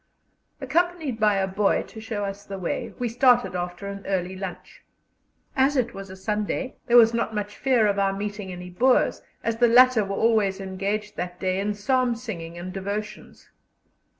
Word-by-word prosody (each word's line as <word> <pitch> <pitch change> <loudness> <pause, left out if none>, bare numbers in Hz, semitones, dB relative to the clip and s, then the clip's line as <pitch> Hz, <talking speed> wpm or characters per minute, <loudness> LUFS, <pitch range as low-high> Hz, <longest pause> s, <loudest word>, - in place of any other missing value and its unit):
Accompanied 340 -8 0
by 210 -1 +4
a 195 -1 +1
boy 195 +1 +1
to 220 - -11
show 220 -2 -3
us 200 +1 -6
the 195 -1 -7
way, 180 -3 -3
we 245 - -1
started 240 -4 +3
after 175 +1 -4
an 200 0 -6
early 190 -1 -1
lunch. 190 -1 -8 0.7
As 270 +2 +3
it 240 -2 0
was 195 0 -8
a 190 - -8
Sunday, 210 +6 -2
there 240 - +6
was 230 -1 +7
not 230 -1 -1
much 205 0 -3
fear 250 -4 +2
of 200 -1 +1
our 195 0 +2
meeting 205 0 -5
any 180 0 -8
Boers, 250 +8 +2 0.2
as 230 -1 -1
the 240 0 +5
latter 250 -1 +6
were 195 0 -3
always 210 -3 +2
engaged 200 +2 -3
that 180 0 -5
day 185 0 0
in 205 +1 -1
psalm 250 +3 +1
singing 170 -8 -7
and 180 +1 -6
devotions. 205 +2 -6
205 Hz, 180 wpm, -25 LUFS, 190-235 Hz, 0.7 s, was